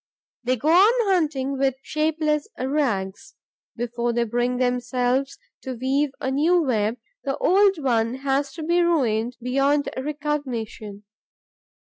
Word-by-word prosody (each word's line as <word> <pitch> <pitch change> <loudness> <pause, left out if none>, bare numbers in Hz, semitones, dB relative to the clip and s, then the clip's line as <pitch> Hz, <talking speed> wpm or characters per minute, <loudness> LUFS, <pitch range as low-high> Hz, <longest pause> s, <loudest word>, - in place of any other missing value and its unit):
They 255 +1 +1
go 285 +6 -1
on 405 +4 +5
hunting 280 -6 0
with 270 -1 +2
shapeless 305 -1 0
rags. 245 -8 -2 0.4
Before 240 0 -2
they 235 0 +1
bring 240 +2 -1
themselves 250 +2 0 0.2
to 260 -1 -5
weave 270 +4 0
a 265 - -2
new 320 +6 +3
web, 225 -4 0 0.3
the 275 -2 -2
old 390 +1 +4
one 240 -4 0
has 275 +1 -1
to 325 - -7
be 345 +2 +2
ruined 245 -8 +1
beyond 275 +3 +1
recognition. 260 -8 -4
270 Hz, 125 wpm, -23 LUFS, 245-300 Hz, 0.4 s, on